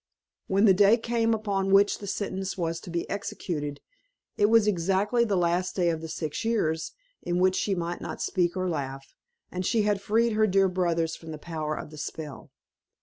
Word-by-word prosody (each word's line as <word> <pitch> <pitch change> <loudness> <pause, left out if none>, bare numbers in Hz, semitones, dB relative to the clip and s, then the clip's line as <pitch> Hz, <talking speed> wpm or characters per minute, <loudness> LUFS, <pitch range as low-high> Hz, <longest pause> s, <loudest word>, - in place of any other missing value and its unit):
When 195 +3 +3
the 195 - +7
day 205 +4 +5
came 230 -1 0
upon 200 -3 -1
which 200 +1 +4
the 200 - -8
sentence 190 -1 -3
was 165 -2 -2
to 180 - -11
be 170 0 -2
executed, 150 -7 -4 0.5
it 205 - +3
was 225 -1 +5
exactly 200 +4 +2
the 205 -3 0
last 180 +1 +1
day 175 -3 +2
of 160 -1 -4
the 160 - -6
six 155 +2 -4
years, 165 -9 0 0.3
in 175 0 -1
which 185 +1 +3
she 195 0 0
might 175 0 -3
not - - -6
speak 175 0 0
or 185 0 0
laugh; 135 -5 -4 0.4
and 180 0 -3
she 220 +3 +2
had 205 -1 +1
freed 225 +3 +2
her 215 0 +3
dear 195 -1 +3
brothers 170 -3 0
from 165 - -12
the 155 - -5
power 155 -1 -4
of 150 - -7
the 155 - -10
spell. 150 -3 -7
185 Hz, 200 wpm, -27 LUFS, 165-205 Hz, 0.5 s, the